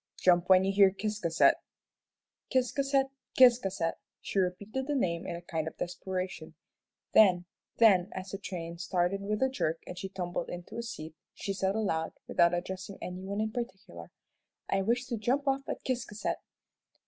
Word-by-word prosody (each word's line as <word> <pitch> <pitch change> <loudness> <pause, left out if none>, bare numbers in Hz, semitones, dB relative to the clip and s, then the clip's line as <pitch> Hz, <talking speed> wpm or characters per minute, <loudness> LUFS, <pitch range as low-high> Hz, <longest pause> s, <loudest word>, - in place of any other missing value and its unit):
"Jump 175 0 +3
when 185 0 +7
you 195 - +2
hear 195 -1 +7
Ciscasset." 195 -4 +2 0.9
"Ciscasset, 270 +1 +2 0.3
Ciscasset!" 195 -10 +4 0.2
she 195 - -2
repeated 200 +8 -2
the 295 - 0
name 170 -9 0
in - - -3
a 170 - -8
kind 160 -2 -3
of - - -6
desperation, 185 +1 -4 0.6
then, 180 -5 +6 0.7
as 185 0 -6
the 195 - -5
train 170 -4 -6
started 180 +2 0
with 210 +4 -1
a - - +5
jerk 165 - -2
and 180 - -7
she 195 - -5
tumbled 175 -2 -4
into 175 +3 -7
a 235 - -2
seat, 160 -9 -7 0.2
she 195 - -3
said 195 0 0
aloud, 165 -7 -1
and - - -37
without 170 0 +4
addressing 190 +2 -5
any 180 0 -6
one 200 +2 -4
in 220 0 -1
particular, 190 - -6 0.6
"I 195 - +1
wish 235 +6 +1
to 235 - -3
jump 260 +7 0
off 275 0 0
at - - -4
Ciscasset." 240 -5 -2
195 Hz, 165 wpm, -30 LUFS, 175-220 Hz, 0.9 s, when